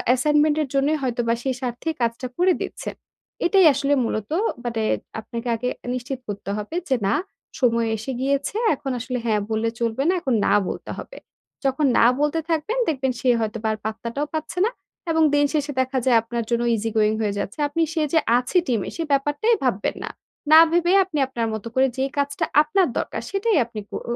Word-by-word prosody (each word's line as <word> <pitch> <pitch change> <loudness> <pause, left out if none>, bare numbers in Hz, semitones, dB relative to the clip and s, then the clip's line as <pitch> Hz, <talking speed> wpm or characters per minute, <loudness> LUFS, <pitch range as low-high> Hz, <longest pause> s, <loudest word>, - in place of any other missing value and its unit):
assignment 295 +3 +3
এর 295 - -1
জন্যই 280 +3 +2
হয়তোবা 240 -2 0
সেই 265 - 0
স্বার্থে 245 +5 -3
কাজটা 235 +2 -1
করে 365 +1 +4
দিচ্ছেন। - - -5 0.5
এটাই 380 +1 +5
আসলে 280 +1 +1
মূলত 215 0 -3 0.3
মানে 230 -2 -2 0.4
আপনাকে 230 +2 -6
আগে 250 +2 -2 0.2
নিশ্চিত 255 +1 -4
করতে 200 -1 -6
হবে 210 +9 -5
যে 265 - +4
না, 195 - +2 0.5
সময় 230 -2 +3
এসে 225 +5 -5
গিয়েছে, 280 +6 0 0.2
এখন 270 -1 -5
আসলে 250 +1 -3
হ্যাঁ 215 -2 +1
বললে 220 +1 +1
চলবে 235 +2 0
না, - - +4
এখন 265 -6 0
না - - +3 0.2
বলতে - - -6
হবে। - - -9 0.5
যখন 275 +3 +2
না - - +6
বলতে 295 +2 +1
থাকবেন, 325 +9 0
দেখবেন 265 -4 0
সে 255 - +1
হয়তোবা 220 0 -2
আর - - -5
পাত্তাটাও 230 +6 -3
পাচ্ছে 315 +3 -4
না। 455 - 0 0.4
এবং 320 0 +3
দিন 290 0 +4
শেষে 295 -1 0
দেখা 260 +1 -2
যায় 250 -3 +5
আপনার 235 +1 -3
জন্য 235 0 +1
easy 225 +1 -2
going 215 0 +3
হয়ে 210 -2 0
যাচ্ছে। 200 +7 -5
আপনি 290 +3 -2
সে 325 - 0
যে 325 - +6 0.2
আছে 250 +8 0
টিমে 230 -6 0
সে 335 - -2
ব্যাপারটাই 290 +11 +2
ভাববেন 225 -6 0
না। - - -4 0.4
না 315 - +10
ভেবে 345 +1 +2
আপনি 365 -5 -5
আপনার 235 -3 -2
মতো 220 +1 -5
করে 265 +1 +4
যে 265 - +1
কাজটা 285 0 0 0.2
আপনার 345 +4 +2
দরকার - - -3
সেটাই 400 +1 +1
আপনি 230 -2 -8
কর - - -4
260 Hz, 190 wpm, -23 LUFS, 230-300 Hz, 0.5 s, না